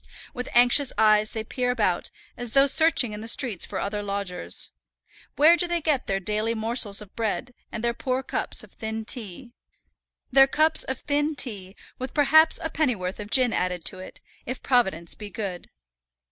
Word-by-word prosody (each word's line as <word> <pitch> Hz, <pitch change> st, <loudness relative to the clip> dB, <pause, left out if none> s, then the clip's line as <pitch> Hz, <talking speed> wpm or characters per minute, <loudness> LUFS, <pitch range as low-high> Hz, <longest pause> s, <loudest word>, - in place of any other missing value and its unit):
With 250 Hz, 0 st, -5 dB
anxious 245 Hz, +3 st, +5 dB
eyes 215 Hz, -1 st, +4 dB
they 220 Hz, -, -5 dB
peer 250 Hz, +3 st, -2 dB
about, 210 Hz, -8 st, 0 dB, 0.3 s
as 245 Hz, -2 st, -5 dB
though 275 Hz, 0 st, +6 dB
searching 280 Hz, -6 st, +3 dB
in 210 Hz, -, -7 dB
the 225 Hz, -, -7 dB
streets 230 Hz, -7 st, +1 dB
for -, -, -5 dB
other 205 Hz, +1 st, -3 dB
lodgers. 200 Hz, -, -3 dB, 0.6 s
Where 315 Hz, +4 st, +6 dB
do 350 Hz, 0 st, +1 dB
they 345 Hz, 0 st, -1 dB
get 295 Hz, -4 st, -1 dB
their 195 Hz, 0 st, 0 dB
daily 215 Hz, +4 st, -1 dB
morsels 220 Hz, -2 st, +1 dB
of 205 Hz, -2 st, -14 dB
bread, 230 Hz, +2 st, -3 dB, 0.2 s
and 230 Hz, -, -6 dB
their 235 Hz, 0 st, +1 dB
poor 255 Hz, +2 st, -2 dB
cups -, -, -3 dB
of -, -, -16 dB
thin 220 Hz, 0 st, -5 dB
tea, 235 Hz, +1 st, -5 dB, 0.8 s
their 270 Hz, +1 st, +6 dB
cups 315 Hz, +3 st, +3 dB
of 260 Hz, -1 st, -5 dB
thin 295 Hz, +1 st, -1 dB
tea, 200 Hz, -8 st, -6 dB, 0.2 s
with 255 Hz, 0 st, -6 dB
perhaps 315 Hz, +3 st, +5 dB
a 320 Hz, -, -3 dB
pennyworth 220 Hz, -13 st, -1 dB
of 210 Hz, 0 st, -7 dB
gin 250 Hz, -1 st, +3 dB
added 180 Hz, -2 st, -2 dB
to 185 Hz, -, -3 dB
it, 185 Hz, -, -11 dB, 0.2 s
if 255 Hz, +1 st, -6 dB
Providence 190 Hz, -10 st, +1 dB
be 210 Hz, -1 st, -9 dB
good! 195 Hz, -5 st, -6 dB
235 Hz, 180 wpm, -25 LUFS, 205-270 Hz, 0.8 s, though